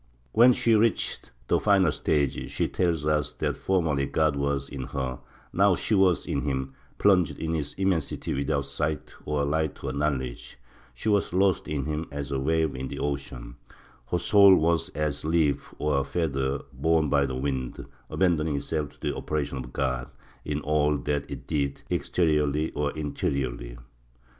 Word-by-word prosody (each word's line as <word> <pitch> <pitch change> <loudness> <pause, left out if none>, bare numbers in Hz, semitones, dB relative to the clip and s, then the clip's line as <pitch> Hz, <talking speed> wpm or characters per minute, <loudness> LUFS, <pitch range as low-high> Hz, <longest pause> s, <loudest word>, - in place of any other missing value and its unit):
When 120 - +7
she 115 -1 +2
reached 110 - +1 0.2
the - - +3
final 95 -6 +4
stage 75 -2 0
she - - 0
tells 85 -5 0
us 75 -2 +1
that - - -2
formerly 80 -7 0
God 80 -2 +1
was 70 -1 -1
in 65 -3 -6
her, 65 -2 -4 0.3
now 95 0 +4
she 110 - -1
was 95 -4 +3
in 70 - -1
him, 65 -2 -2 0.2
plunged 95 -4 +3
in 80 - -3
his 75 -3 -2
immensity 95 -6 -1
without 70 0 -1
sight 75 +1 -3
or 75 -1 0
light 80 +1 -1
or 65 -1 -2
knowledge; 70 -4 -2 0.4
she - - -5
was 100 -4 +2
lost 95 0 +2
in 75 -3 -2
him 75 +1 -3
as 70 0 -5
a 70 - 0
wave 80 +2 +1
in 65 +1 -4
the - - -6
ocean; 65 -4 -4 0.5
her 90 - +1
soul 100 +1 +7
was 85 -1 +2
as 75 -1 -1
a - - -3
leaf 80 -3 +1
or 75 -2 +1
a - - 0
feather 70 -2 -1
borne 80 +3 +2
by 70 -1 +2
the 65 - -4
wind, 65 -2 -3 0.2
abandoning 80 -5 +1
itself 75 +1 -2
to - - -22
the - - -1
operation 70 -3 -2
of 60 -1 -7
God 65 -2 -2 0.3
in 75 0 -2
all 75 0 +2
that 70 +2 -2
it - - -7
did, 70 -3 -2
exteriorly 75 -2 +1
or 75 0 -1
interiorly. 65 -5 -3
75 Hz, 170 wpm, -27 LUFS, 70-80 Hz, 0.5 s, When